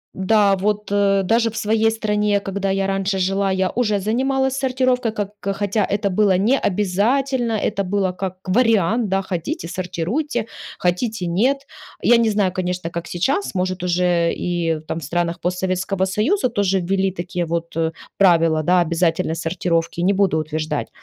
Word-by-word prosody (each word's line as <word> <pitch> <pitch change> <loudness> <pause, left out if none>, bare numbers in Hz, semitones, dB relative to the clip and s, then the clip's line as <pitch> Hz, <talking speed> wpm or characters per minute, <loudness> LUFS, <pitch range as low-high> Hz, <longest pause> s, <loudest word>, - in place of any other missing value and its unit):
да, 200 +1 +3
вот, 210 +1 -1
э, 200 -1 +2
даже 230 +4 +2
в 225 - -11
своей 225 0 +2
стране, 210 -2 0
когда 195 0 -3
я 195 0 0
раньше 195 0 -1
жила, 195 +1 0
я 190 0 +1
уже 215 -4 0
занималась 265 +5 0
сортировкой, 255 -3 +1
как 205 -2 -4
хотя 200 +1 -1
это 200 -1 0
было 195 -1 +3
не 230 +9 +2
обязательно. 230 +6 0
Это 200 -2 -1
было 190 0 0
как 185 0 -5
вариант, 225 0 +2
да: 195 +1 0
хотите 170 -2 -4
сортируйте, 190 - -2 0.3
хотите 185 +2 -1
нет. 255 +11 +1 0.4
Я 240 - +6
не 230 -1 +2
знаю, 205 -3 +1
конечно, 180 -2 -3
как 170 +1 -5
сейчас, 270 - -1
может, 185 0 -1
уже 175 -1 +2
и 165 -3 -1
там 165 - -3
в - - -10
странах 170 +3 -1
постсоветского 185 +1 -1
союза 250 - +1
тоже 200 -4 +1
ввели 190 +1 0
такие 175 0 -3
вот, 170 0 -3
э, 165 0 0 0.3
правила, 165 -4 +4
да, 180 +2 +4
обязательной 165 -1 0
сортировки. 165 0 -1
Не 190 +3 +3
буду 195 -5 +2
утверждать. 155 -1 -3
195 Hz, 160 wpm, -20 LUFS, 180-215 Hz, 0.4 s, Я